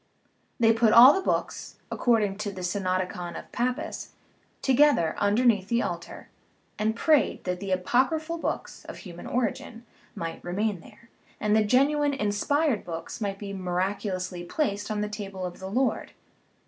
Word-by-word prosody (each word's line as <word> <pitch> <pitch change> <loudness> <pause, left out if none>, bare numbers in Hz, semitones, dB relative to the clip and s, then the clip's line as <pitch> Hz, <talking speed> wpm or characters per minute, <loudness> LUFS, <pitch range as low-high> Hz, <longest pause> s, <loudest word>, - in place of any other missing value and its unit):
They 225 -1 +5
put 225 -1 +3
all 250 +5 +10
the 385 - 0
books - - -2 0.2
(ac - - -6
cording 215 -5 +2
to 210 -1 -3
the 190 -2 -8
Synodicon 185 -1 -2
of - - -10
Pappus) 245 +1 -3 0.5
together 265 - +4
under 210 +5 +2
neath 205 -6 +3
the 235 0 +1
altar, - - -6 0.5
and 220 +1 +1
prayed 305 +4 +2
that 180 -1 -2
the 195 0 -5
apocryphal 265 - +1
books, - - -4
of - - -8
human 175 -4 -10
origin, 240 -1 -3 0.3
might 165 -1 -5
remain 200 +2 -1
there, 230 +7 -17 0.3
and 210 0 +2
the 220 - +4
genuine, 280 +5 +2
inspired 255 +4 0
books 165 +5 -7
might 200 -2 -2
be 200 -1 -7
miraculously 185 0 -2
placed 205 - -2
on 210 -1 -1
the 210 - -1
table 200 -3 -6
of 175 -1 -7
the 190 0 -6
Lord. 255 +5 -1
210 Hz, 160 wpm, -27 LUFS, 185-245 Hz, 0.5 s, all